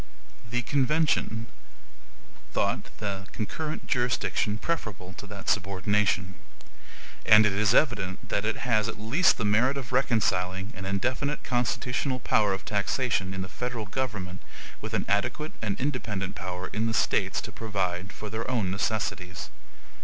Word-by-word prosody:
The 125 +2 0
convention 135 -3 +2 1.1
thought - - +1
the 100 -2 -4
concurrent 155 +8 -3
jurisdiction 120 -3 +1
preferable 105 - -3
to 105 - -9
that 100 -1 -9
subordination; 100 -1 +1 0.9
and 110 0 +8
it 105 - +3
is 105 0 +3
evident 105 -11 +2
that 100 - +1
it 115 +4 -1
has 110 -3 +3
at - - -5
least 140 - +4
the 115 - -1
merit 120 +7 +3
of 130 -3 -5
reconciling 95 -6 +1
an 95 0 -6
indefinite 130 +9 0
constitutional 125 +1 0
power 105 -3 +3
of 95 0 -3
taxation 100 -1 0
in 95 0 -3
the - - -6
Federal 115 +4 -4
government 100 -5 -3 0.4
with - - -3
an - - 0
adequate 105 - 0
and 105 -3 -1
independent 110 -9 -2
power 90 -1 -4
in 110 +2 +1
the 110 - 0
States - - +2
to - - -7
provide 95 -3 -2
for 105 -1 -7
their 115 +2 -3
own 110 -8 +1
necessities. 95 -3 -2
105 Hz, 145 wpm, -28 LUFS, 95-125 Hz, 1.1 s, and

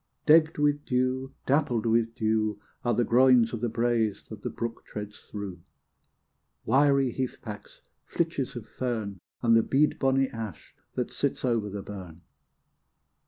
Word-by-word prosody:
D 150 - +7
egged 160 0 +5
with 145 0 +2
dew, 130 +1 -1
dappled 130 -5 +1
with 115 0 +2
dew 110 -2 0 0.2
Are 120 -2 +1
the 120 - +3
groins 125 -1 +5
of 115 - -3
the 120 - 0
braes 115 -3 0
that 110 -2 -9
the - - -3
brook 115 -1 -5
treads 105 0 -8
through, 100 -5 -6 1.0
Wiry 140 -2 +3
heathpacks, 120 -5 -6 0.3
flitches 160 -7 -1
of 120 -3 -6
fern, 110 -6 -3 0.2
And 115 -1 +5
the 115 - +6
bead 145 +5 +2
bonny 135 0 +3
ash 110 -3 -7 0.2
that - - -2
sits - - -1
over 115 -4 +1
the 100 0 -6
burn. 90 -5 -9
115 Hz, 150 wpm, -28 LUFS, 110-130 Hz, 1.0 s, D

